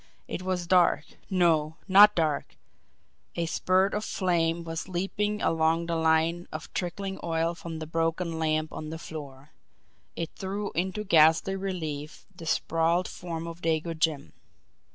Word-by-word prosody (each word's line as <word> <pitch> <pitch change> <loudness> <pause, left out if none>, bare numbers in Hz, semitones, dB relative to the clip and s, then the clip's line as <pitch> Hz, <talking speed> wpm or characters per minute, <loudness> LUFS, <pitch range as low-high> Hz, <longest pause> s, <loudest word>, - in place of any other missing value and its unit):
It - - -4
was 185 -1 -2
dark 180 0 +4 0.2
no, 165 -5 +2
not 205 +2 +8
dark 155 -4 -1 0.8
a 170 - 0
spurt 185 +3 +2
of 210 - -1
flame 170 -4 0
was 165 +1 -5
leaping 200 +3 -2
along 165 +1 +2
the 170 0 -1
line 160 +2 +2
of 155 0 -7
trickling 190 +2 -3
oil 165 0 0
from 170 -1 -7
the 160 - -5
broken 165 +1 -1
lamp 155 -1 0
on 155 - -6
the 160 - -5
floor. 145 -3 -9 0.6
It 165 -1 -4
threw 200 +1 -4
into 190 +5 -2
ghastly 165 0 +4
relief 160 -6 -5
the 165 -2 -9
sprawled 165 +3 +1
form 165 -2 -6
of 170 +1 -8
Dago 165 0 0
Jim. 155 - -1
165 Hz, 145 wpm, -28 LUFS, 160-185 Hz, 0.8 s, not